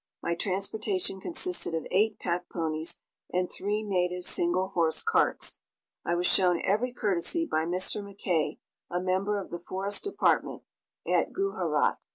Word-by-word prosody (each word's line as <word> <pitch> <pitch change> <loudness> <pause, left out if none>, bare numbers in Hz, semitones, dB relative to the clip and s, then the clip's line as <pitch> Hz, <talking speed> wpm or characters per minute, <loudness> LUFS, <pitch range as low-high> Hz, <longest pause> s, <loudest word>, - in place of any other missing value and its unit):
My 170 - +1
transportation 195 +1 -1
consisted 350 - -1
of 160 - -2
eight 210 +4 +3
pack 175 0 -2
ponies 160 -1 -2 0.3
and 180 0 +1
three 210 +2 -1
native 180 -3 0
single 180 +2 +1
horse 165 -4 +1
carts. - - +1 0.4
I 175 - +1
was 175 +1 0
shown 180 -3 +4
every 215 +6 +2
courtesy 215 - 0
by 160 - +1
Mr. 180 +4 -1
McKay, 180 -6 -1 0.3
a 175 - 0
member 190 +3 +1
of 195 - -5
the 175 - -4
Forest 195 - -3
Department, 400 - +1 0.4
at - - +2
Gujarat. 395 0 +1
185 Hz, 145 wpm, -29 LUFS, 175-205 Hz, 0.4 s, shown